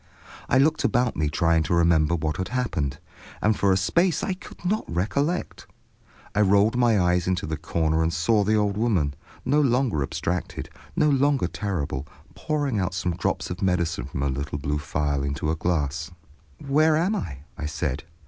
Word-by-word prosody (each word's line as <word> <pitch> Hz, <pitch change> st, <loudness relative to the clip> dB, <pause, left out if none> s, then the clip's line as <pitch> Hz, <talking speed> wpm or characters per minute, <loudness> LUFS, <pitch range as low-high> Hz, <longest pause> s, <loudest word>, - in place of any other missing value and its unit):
I 130 Hz, -, +4 dB
looked 155 Hz, +4 st, +3 dB
about 120 Hz, 0 st, +1 dB
me 75 Hz, -1 st, 0 dB
trying 80 Hz, +2 st, +2 dB
to 85 Hz, -, 0 dB
remember 85 Hz, -1 st, +3 dB
what 80 Hz, -2 st, -2 dB
had 95 Hz, -, -2 dB
happened, 85 Hz, -, -2 dB, 0.4 s
and 105 Hz, 0 st, +2 dB
for 100 Hz, -1 st, +2 dB
a 95 Hz, -, +4 dB
space 170 Hz, -, +2 dB
I 190 Hz, -, 0 dB
could 185 Hz, -, -13 dB
not 210 Hz, +4 st, +1 dB
recollect. 140 Hz, -, -1 dB, 0.7 s
I 105 Hz, -, +2 dB
rolled 100 Hz, +3 st, +4 dB
my 120 Hz, -4 st, +3 dB
eyes 90 Hz, -1 st, +2 dB
into 90 Hz, -1 st, 0 dB
the 80 Hz, +1 st, -2 dB
corner 80 Hz, 0 st, 0 dB
and 80 Hz, 0 st, +1 dB
saw 105 Hz, +6 st, +2 dB
the 110 Hz, +2 st, +2 dB
old 105 Hz, -1 st, +1 dB
woman, 95 Hz, -11 st, +1 dB, 0.3 s
no 145 Hz, +3 st, +3 dB
longer 125 Hz, -, +2 dB
abstracted, 85 Hz, +3 st, -3 dB, 0.2 s
no 150 Hz, -, +3 dB
longer 140 Hz, -5 st, +3 dB
terrible, 85 Hz, -7 st, -3 dB, 0.3 s
pouring 145 Hz, -7 st, -1 dB
out 90 Hz, -1 st, -1 dB
some 90 Hz, -2 st, -1 dB
drops -, -, -2 dB
of 90 Hz, -, -5 dB
medicine 90 Hz, -9 st, 0 dB
from 70 Hz, 0 st, -4 dB
a 70 Hz, -, +1 dB
little 70 Hz, +2 st, -3 dB
blue 75 Hz, +1 st, -2 dB
phial 75 Hz, -1 st, -1 dB
into 70 Hz, +2 st, -1 dB
a -, -, 0 dB
glass. 80 Hz, -1 st, -1 dB, 0.5 s
"Where 155 Hz, +3 st, +3 dB
am 185 Hz, +7 st, +1 dB
I?" 70 Hz, -, -5 dB
I 75 Hz, -, -4 dB
said. 75 Hz, -2 st, -3 dB
90 Hz, 180 wpm, -25 LUFS, 80-120 Hz, 0.7 s, I